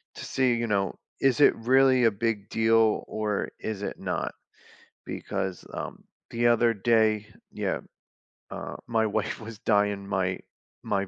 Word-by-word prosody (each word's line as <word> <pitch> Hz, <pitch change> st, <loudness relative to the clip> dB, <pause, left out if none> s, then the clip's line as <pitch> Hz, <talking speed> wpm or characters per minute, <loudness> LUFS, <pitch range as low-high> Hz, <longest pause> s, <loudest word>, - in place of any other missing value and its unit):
to -, -, -7 dB
see, 130 Hz, -2 st, +2 dB
you 115 Hz, 0 st, -1 dB
know, 100 Hz, -2 st, 0 dB, 0.2 s
is 135 Hz, 0 st, +3 dB
it 145 Hz, -, +6 dB
really 130 Hz, +2 st, +4 dB
a 115 Hz, -, +5 dB
big 105 Hz, -1 st, -2 dB
deal 110 Hz, -1 st, +3 dB
or 105 Hz, -2 st, -2 dB
is 105 Hz, -2 st, -4 dB
it -, -, -4 dB
not? -, -, -3 dB, 0.7 s
Because, 95 Hz, -2 st, -4 dB
um, -, -, -6 dB, 0.3 s
the 120 Hz, 0 st, +2 dB
other 115 Hz, 0 st, +4 dB
day 110 Hz, 0 st, +2 dB, 0.2 s
Yeah, -, -, -2 dB, 0.7 s
uh, -, -, -6 dB
my 110 Hz, -1 st, +2 dB
wife 105 Hz, 0 st, -2 dB
was 110 Hz, -1 st, -8 dB
dyeing 100 Hz, -2 st, +1 dB
my 95 Hz, -2 st, 0 dB, 0.5 s
my 100 Hz, -1 st, -1 dB
110 Hz, 145 wpm, -27 LUFS, 100-115 Hz, 0.7 s, it